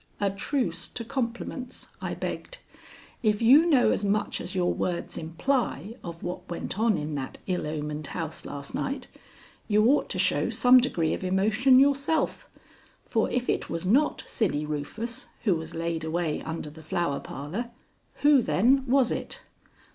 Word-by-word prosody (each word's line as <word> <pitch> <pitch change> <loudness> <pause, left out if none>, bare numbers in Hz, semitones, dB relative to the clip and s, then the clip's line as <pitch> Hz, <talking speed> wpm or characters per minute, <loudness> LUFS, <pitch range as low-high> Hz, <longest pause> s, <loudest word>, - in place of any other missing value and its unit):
"A 200 -1 +1
truce 195 - -2
to 230 - -5
compliments," 245 +1 -4
I - - -3
begged. - - -5 0.6
"If 210 -3 +2
you 275 +9 +7
know 280 -7 +5
as - - 0
much 205 +1 0
as - - -5
your 180 -1 +2
words 175 -1 -3
imply 195 - -1
of 170 -1 -8
what 175 +1 -5
went 175 +3 -4
on 225 -3 +3
in 150 +1 -4
that 135 -2 -4
ill 180 -4 -1
omened 150 -1 -4
house 165 -3 -5
last 140 -1 -7
night, 270 -2 -3 0.6
you 215 0 +4
ought 275 +5 +3
to - - -2
show - - +2
some 250 +1 +6
degree 170 -10 0
of - - -4
emotion 215 +8 +4
yourself, 280 +3 +2 0.6
for - - +1
if 250 0 -1
it - - -1
was 165 +2 -3
not 270 +11 +2
Silly 150 -9 -1
Rufus 180 +11 -4 0.2
who 205 -5 +3
was 160 0 -6
laid 165 -1 -2
away 160 -1 -1
under 160 -2 -5
the 160 +1 -12
Flower 160 -3 -1
Parlor, 170 - -5 0.5
who, 290 -2 +7
then, 255 +6 +3
was 260 -1 +3
it? - - -4
195 Hz, 160 wpm, -27 LUFS, 160-250 Hz, 0.6 s, you